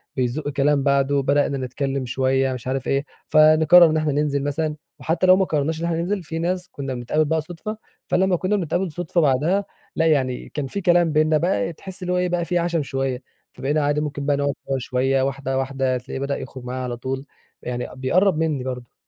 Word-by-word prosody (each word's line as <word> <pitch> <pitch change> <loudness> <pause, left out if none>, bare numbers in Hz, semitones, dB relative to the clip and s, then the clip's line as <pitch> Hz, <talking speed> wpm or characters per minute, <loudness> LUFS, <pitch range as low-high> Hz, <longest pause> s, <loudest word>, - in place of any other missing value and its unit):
بيزق 130 +4 -1
كلام 145 0 +2
بعده، 140 0 +2
بدأنا 140 0 +1
نتكلم 135 +1 -3
شوية 130 +1 +1
مش 125 -1 -7
عارف 130 0 -2
إيه 140 +1 0 0.2
فنقرر 155 +3 +7
إن 155 - +1
إحنا 155 -1 0
ننزل 145 -1 0
مثلًا، 150 +1 -1 0.2
وحتى 165 +3 0
لو 185 - +8
ما 190 - +2
قررناش 155 0 -1
إن 170 - -2
إحنا 170 -1 0
ننزل 185 +3 -2
في 165 +1 -5
ناس 180 +2 -2
كنا 135 -2 -5
بنتقابل 125 +6 0
بقى 160 +1 0
صدفة، 180 +6 -7 0.3
فلمَّا 190 0 +2
كنا 185 +4 0
بنتقابل 175 0 -1
صدفة 175 +1 -1
بعدها 155 +8 +2 0.3
لأ، 165 - +2
يعني 130 -5 0
كان 145 -2 -4
في 200 +9 -4
كلام 175 -2 +3
بيننا 155 0 +3
بقى 170 0 0
تحس 190 +4 -9
اللي 180 0 -1
هو - - +1
إيه 180 0 +1
بقى 175 -1 0
في 175 +1 0
عَشَم 170 -3 0
شوية، 135 -1 -2 0.3
فبقينا 150 +3 -1
عادي 145 +1 +1
ممكن 145 -1 -4
بقى 145 -1 +2
نقعد 145 0 0
سوا 135 -1 0
شوية 130 +2 0
واحدة 135 0 -2
واحدة 135 -1 0
هتلاقيه 125 +1 -5
بدأ 140 +1 -2
يخرج 130 - -8
معايا 125 +1 -4
على 120 -1 -4
طول، 130 +2 -4 0.4
يعني 125 0 -4
بيقرب 170 +7 +2
منِّي 155 -5 0
برضه. 125 -2 -6
145 Hz, 210 wpm, -22 LUFS, 135-170 Hz, 0.4 s, لو